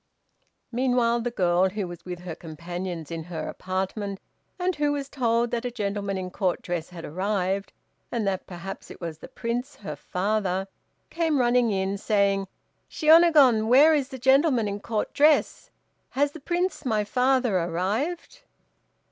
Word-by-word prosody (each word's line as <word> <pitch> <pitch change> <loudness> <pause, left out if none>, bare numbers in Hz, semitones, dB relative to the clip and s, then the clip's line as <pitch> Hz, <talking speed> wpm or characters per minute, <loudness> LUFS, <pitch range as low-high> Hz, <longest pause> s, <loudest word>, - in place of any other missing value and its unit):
Meanwhile 240 -1 +2
the 245 - -1
girl, 185 -4 +2
who 200 -1 -3
was 175 0 -9
with 180 -1 -6
her 180 -2 -6
companions 170 +1 -6
in 165 -1 -5
her 165 -3 -5
apartment, 190 +2 -3 0.4
and 365 0 0
who 295 0 +1
was 280 -1 -3
told 235 -3 0
that 235 -1 -1
a 250 - -2
gentleman 200 -3 -3
in 185 -1 -5
Court 185 -2 -1
dress 175 -2 -3
had 175 -2 -9
arrived, 190 +3 -1 0.4
and 230 -3 -1
that 190 -1 -2
perhaps 185 +2 -8
it - - -11
was 165 -3 -6
the - - -10
Prince, 245 +2 -4
her 155 -7 -7
father, 190 +3 -1 0.4
came 325 -3 +1
running 245 -1 +3
in, 195 0 -1
saying, 200 -2 +1 0.4
"Shiônagon, 305 -8 +5
where 285 +7 +7
is 280 -3 0
the 265 - -7
gentleman 265 -2 +3
in 200 0 -3
Court 215 0 -3
dress; 300 +1 +3 0.4
has 285 +1 +1
the 320 - -10
Prince, 350 +5 -1
my 220 -4 +1
father, 250 -2 +2
arrived?" 205 - -2
210 Hz, 155 wpm, -26 LUFS, 185-260 Hz, 0.4 s, where